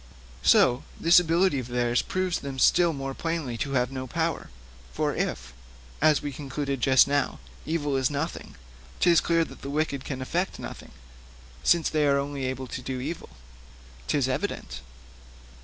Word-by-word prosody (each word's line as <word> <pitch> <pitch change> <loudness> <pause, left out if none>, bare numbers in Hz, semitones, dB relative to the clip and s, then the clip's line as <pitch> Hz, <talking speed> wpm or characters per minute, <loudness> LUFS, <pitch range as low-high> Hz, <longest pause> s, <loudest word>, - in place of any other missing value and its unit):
So 125 - +5 0.2
this 170 +2 +7
ability 170 -2 +2
of 125 - -6
theirs 120 -1 +1
proves 185 -1 -1
them 135 -1 -6
still 170 +6 +4
more 135 -2 -4
plainly 165 -6 -3
to 140 +3 -2
have 125 -1 +1
no 130 -1 -5
power. - - -2 0.4
For - - -1
if, - - -3 0.5
as 155 -1 +4
we 145 - -3
concluded 140 -1 -4
just 130 +1 +5
now, 145 0 0 0.3
evil 150 -3 -1
is 130 -1 +2
nothing, 145 +3 -4 0.4
'tis 170 -2 +5
clear 165 -1 +2
that - - -13
the 140 - -6
wicked 140 -2 -1
can 135 -2 -5
effect 175 +8 -2
nothing, - - -8 0.7
since 170 -2 +4
they 150 -1 +1
are 140 0 +4
only 140 -1 -3
able 130 0 -3
to 130 - -6
do 130 0 -4
evil.' 155 +6 -5 0.8
''Tis - - +1
evident.' - - -3
140 Hz, 160 wpm, -26 LUFS, 130-160 Hz, 0.8 s, this